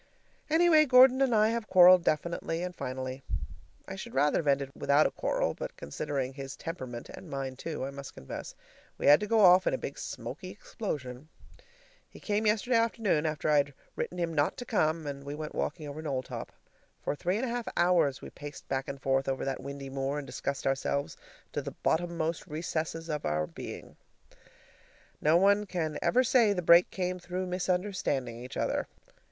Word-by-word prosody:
Anyway, 320 -1 +6
Gordon 260 -1 +6
and 260 -4 +3
I 215 0 +4
have 230 -1 -2
quarreled 180 -1 +8
definitely 165 +1 -1
and 180 -1 -5
finally. 130 -1 -5 0.7
I 190 - -6
should 190 - -8
rather 145 +2 +3
have 155 - -4
ended 140 -1 +1
without 140 +3 +3
a - - +1
quarrel, - - -1
but - - -7
considering 135 - -3
his 135 0 -7
temperament, 130 -8 -6
and - - -10
mine, 135 -1 -4
too, 150 0 -4
I 135 - -5
must 140 0 -9
confess, 65 - -8 0.4
we - - -4
had 145 +1 +8
to 210 - -3
go 225 0 +3
off 185 -1 +7
in - - +2
a - - -3
big - - -6
smoky - - -6
explosion. 150 - -6 0.8
He - - -14
came 210 +1 0
yesterday 225 +3 +2
afternoon, 225 -9 +1
after 155 -1 -2
I'd 145 -2 +2 0.2
written 180 - -4
him 170 -2 -1
not 145 -2 +1
to 245 - -6
come, 160 -8 +1
and 140 -1 -5
we 140 +1 -5
went 155 0 -6
walking 155 0 -3
over 145 +2 -6
Knowltop. 135 -4 -4 0.5
For - - -1
three 180 +5 -1
and 250 - -1
a - - -3
half 240 -1 -3
hours 170 -6 +3
we - - -8
paced 145 0 -10
back 135 0 -2
and 140 - -6
forth 135 0 +1
over 135 - -2
that 135 -1 -3
windy 140 0 -7
moor 135 +1 -2
and 145 - -4
discussed 140 0 -4
ourselves 135 +1 -1 0.4
to - - -1
the - - -7
bottommost 170 0 0
recesses 165 0 -3
of 150 -2 -3
our 75 +1 0
beings. - - -9 1.2
No 155 +3 +5
one 200 +3 +4
can 160 -5 -2
ever 255 +1 +3
say 230 -4 +4
the 180 -2 -3
break 170 +2 +7
came 180 -1 -3
through 180 +1 -4
misunderstanding 180 - -1
each 125 - -8
other! - - -1
160 Hz, 185 wpm, -30 LUFS, 140-185 Hz, 1.2 s, quarreled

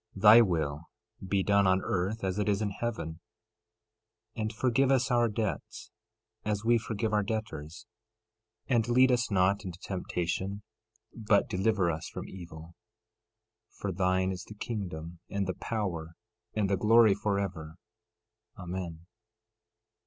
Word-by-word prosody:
13:10 95 - -8
Thy 110 +2 +10
will 80 -8 0 0.5
be 95 0 +1
done 100 0 +3
on 95 0 +4
earth 95 +5 -1
as 95 +1 -1
it 105 - +1
is 100 -1 +2
in 105 -2 -1
heaven. 100 -7 -4 1.2
13:11 - - -4
And 110 +1 -2
forgive 130 +3 +2
us 130 -1 +2
our 120 -1 +3
debts, 110 -1 -4 0.5
as 105 0 -2
we 120 0 +4
forgive 110 -1 -3
our 105 - +3
debtors. 100 -5 -5 0.8
13:12 130 - +2
And 115 +1 0
lead 130 +2 +5
us 125 -1 +1
not 100 +1 +2
into 90 -3 -6
temptation, 95 +2 -3 0.5
but 105 -3 +2
deliver 95 -2 +1
us 80 0 -5
from - - -7
evil. 85 -2 -10 1.0
13:13 - - -23
For 100 - -2
thine 95 +1 +1
is 90 -1 -5
the 105 - -11
kingdom, 90 -7 -5
and 100 -1 -1
the 95 - -2
power, 85 -8 -4 0.4
and 105 -2 +1
the 100 0 +1
glory, 110 +1 +6
forever. 95 -6 -2 0.8
Amen. 90 -3 -6
100 Hz, 145 wpm, -30 LUFS, 90-110 Hz, 1.2 s, Thy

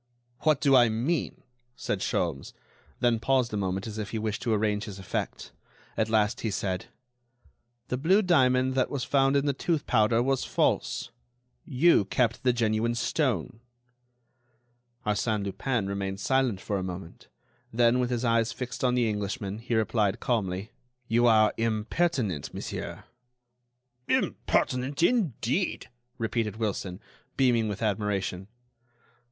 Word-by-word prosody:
"What 155 -3 +2
do 140 -2 +4
I 120 -2 +6
mean?" 130 +9 -2 0.3
said - - -2
Sholmes, 70 - -2 0.5
then 120 -2 +3
paused 130 -2 +1
a - - 0
moment 95 -1 -2
as 110 -1 -6
if 105 - -4
he 115 - -3
wished 110 -1 -2
to 120 - -1
arrange 105 -1 +1
his 100 -3 -8
effect. 95 - -4 0.4
At 110 - 0
last 105 -1 +1
he 110 - -1
said: 95 -2 -2 1.0
"The 125 - -1
blue 190 +9 +4
diamond 130 -7 +3
that 130 -1 +1
was 140 -3 -3
found 135 0 +2
in 140 0 +2
the 140 - +2
tooth 155 +2 -1
powder 115 0 +3
was 135 0 +1
false. 120 - 0 0.5
You 140 - +4
kept 115 +3 0
the 130 -1 +3
genuine 115 0 0
stone." 120 - -1 1.5
Arsène 105 0 0
Lupin 115 +2 -1
remained 100 0 -3
silent 130 -2 +1
for 100 -2 -2
a - - -3
moment; 90 -1 -8 0.4
then, 120 +2 +3
with 125 -1 0
his 125 0 -1
eyes 115 -1 +2
fixed 125 -1 -6
on 125 -1 +3
the 120 -2 +2
Englishman, 105 0 -3
he 115 0 -2
replied, 110 -2 +1
calmly: 100 -4 -1 0.4
"You 120 +1 +3
are 110 -2 +5
impertinent, 110 - -1
monsieur." - - -6 1.0
"Impertinent, 130 +5 0
indeed!" 175 - 0 0.3
repeated 110 -2 -1
Wilson, 100 -4 -3 0.4
beaming 120 -4 +3
with 105 +1 -4
admiration. 100 -3 -1
115 Hz, 140 wpm, -28 LUFS, 105-130 Hz, 1.5 s, I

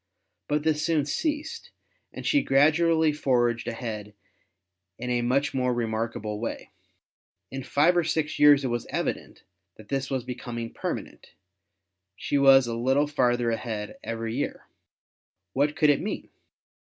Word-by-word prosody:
But 150 0 0
this 155 -1 +1
soon 160 -4 +1
ceased, 300 - -3 0.4
and - - -8
she 290 - +3
gradually 155 - +3
forged 120 -5 +1
ahead 110 -3 -5 0.8
in 125 +1 -4
a 120 0 +1
much 135 +4 +1
more 125 -2 0
remarkable 110 -2 -3
way. 115 - -5 0.8
In 135 - -4
five 145 +6 +3
or 175 - +3
six 160 -1 -1
years 145 -1 +7
it 130 - -1
was 120 0 -3
evident - - -4 0.3
that 110 -1 -15
this 135 -1 -2
was 130 -2 -2
becoming 120 -2 -6
permanent; - - -6 0.8
she 140 - -1
was 135 -1 +7
a 120 - -3
little 130 +5 +2
farther 120 -5 +1
ahead 110 -2 -4
every 115 0 -4
year. 145 - -3 0.9
What 145 +3 +1
could 150 -2 +4
it 145 - 0
mean? 210 - -5
130 Hz, 140 wpm, -26 LUFS, 120-150 Hz, 0.9 s, years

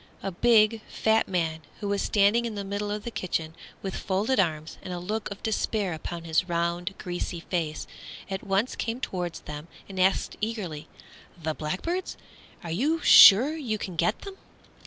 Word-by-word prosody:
A 195 - -2
big, 220 +2 +4
fat 220 0 +2
man 165 -4 -1 0.2
who 205 - -4
was 200 0 0
standing 210 +3 +3
in 225 -2 -4
the 200 - -3
middle 205 +1 -3
of 210 0 -3
the 235 - -5
kitchen 165 -6 -3 0.3
with 195 - -3
folded 205 +6 0
arms 160 -3 -1
and 185 - -7
a 180 - -3
look 210 +5 -3
of 200 0 -9
despair 210 -3 0
upon 165 +1 -6
his 165 +2 0
round, 170 +2 -1
greasy 175 -1 -4
face, 165 -4 -3 0.4
at 190 -1 -4
once 200 +4 0
came 230 +2 -3
toward 180 -8 -3
them 150 +1 -7 0.2
and 190 -1 -7
asked 190 +1 +2
eagerly, 185 -9 -4 0.5
"The 160 -1 -2
blackbirds? 195 - -3 0.5
are 170 - -5
you 295 - +1
sure 255 +11 +9
you 245 -9 -2
can 185 -3 -6
get 215 +6 0
them?" 395 -1 -8
195 Hz, 175 wpm, -27 LUFS, 170-220 Hz, 0.5 s, sure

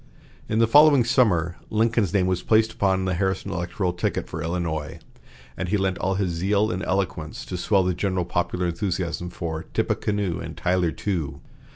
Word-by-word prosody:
In 110 - 0
the 115 - +5
following 145 +2 +6
summer, 90 -9 +2
Lincoln's 110 -3 +1
name 95 -3 +2
was 90 -1 0
placed 110 0 +3
upon 95 -1 +1
the 95 - 0
Harrison 95 +1 -1
electoral 90 +1 -2
ticket 90 - -2
for 80 - -5
Illinois, 80 -3 -3 0.6
and 90 - -3
he 105 - +2
lent 95 -2 -1
all 95 +1 0
his 95 -2 0
zeal 100 +5 +1
and 90 +1 -3
eloquence 90 -5 -2
to 95 - -5
swell 95 +2 +2
the 90 0 +1
general 95 -1 -1
popular 90 +1 -1
enthusiasm 90 -1 -2
for 80 -1 -5
"Tippecanoe 100 -5 0
and - - -7
Tyler 90 -2 +1
too." 80 -9 -3
95 Hz, 175 wpm, -24 LUFS, 85-100 Hz, 0.6 s, following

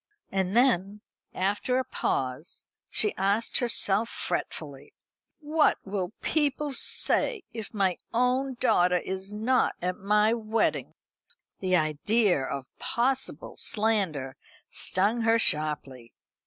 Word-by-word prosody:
And 190 +2 0
then, 210 -5 +2 0.3
after 205 +7 0
a 260 - +1
pause, 130 +5 -3 0.2
she 420 - +3
asked 200 +4 +1
herself, 225 -2 +1
fretfully: 145 -2 -4 0.5
"What 305 +1 +2
will 195 -1 -3
people 295 -1 0
say 440 - +1
if 220 -3 -7
my 195 -4 0
own 250 +2 +1
daughter 180 -8 +3
is 190 +2 -5
not 225 +5 +1
at 180 +1 -3
my 210 +3 +3
wedding?" 225 -1 -1 0.6
The 185 -1 +1
idea 175 +3 +2
of 135 0 -4
possible 265 +3 -1
slander 195 -12 0 0.3
stung 205 +6 +2
her 225 0 +3
sharply. 150 - 0
210 Hz, 110 wpm, -27 LUFS, 180-235 Hz, 0.6 s, she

